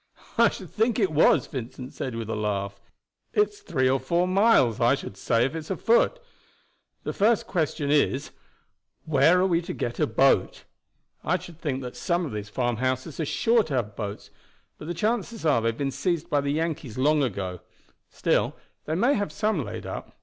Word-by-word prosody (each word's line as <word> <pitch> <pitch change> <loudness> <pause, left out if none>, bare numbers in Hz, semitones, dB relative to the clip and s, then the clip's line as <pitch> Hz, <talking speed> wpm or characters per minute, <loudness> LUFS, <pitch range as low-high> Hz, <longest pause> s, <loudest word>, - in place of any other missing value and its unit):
"I - - +5
should - - -9
think 225 +1 +1
it 195 -8 +2
was," 155 +1 +4
Vincent 130 -1 -7
said 130 -3 -4
with 115 -1 -4
a 110 - -2
laugh. 100 -2 -3 0.5
"It's 420 0 +1
three 130 - 0
or 135 +1 +2
four 170 +7 +1
miles, 185 - +4
I 120 +3 +4
should 135 - -8
say, 115 +4 +1
if 135 - -3
it's 160 -1 -6
a 190 - -2
foot. 235 - +3 0.9
The - - -3
first 220 +2 +2
question 150 -4 -1
is 140 -2 +1 0.7
where 155 +4 +4
are 185 - +3
we 170 -3 +2
to 180 +1 -5
get 120 - -3
a - - +2
boat? 135 +4 +2 0.6
I 180 +3 +1
should 175 -2 -12
think 135 -4 -2
that 125 - -7
some 175 0 0
of 150 - -5
these 105 -1 -5
farmhouses 130 +5 -2
are 160 - 0
sure 230 +9 +3
to 145 - -3
have 110 -4 -2
boats, 105 -2 -6 0.5
but 150 - -8
the 175 - -3
chances 220 0 -1
are 145 -7 +3
they 115 - 0
have 115 - -4
been 140 -1 -1
seized 170 +4 -2
by 145 - +3
the 140 - -2
Yankees 155 -6 -3
long 150 +3 +3
ago. 95 -8 -2 0.5
Still - - 0 0.3
they 155 - -2
may 240 +10 +3
have 205 -5 -1
some 210 -8 0
laid 105 - -7
up. - - -7
145 Hz, 195 wpm, -26 LUFS, 120-180 Hz, 0.9 s, I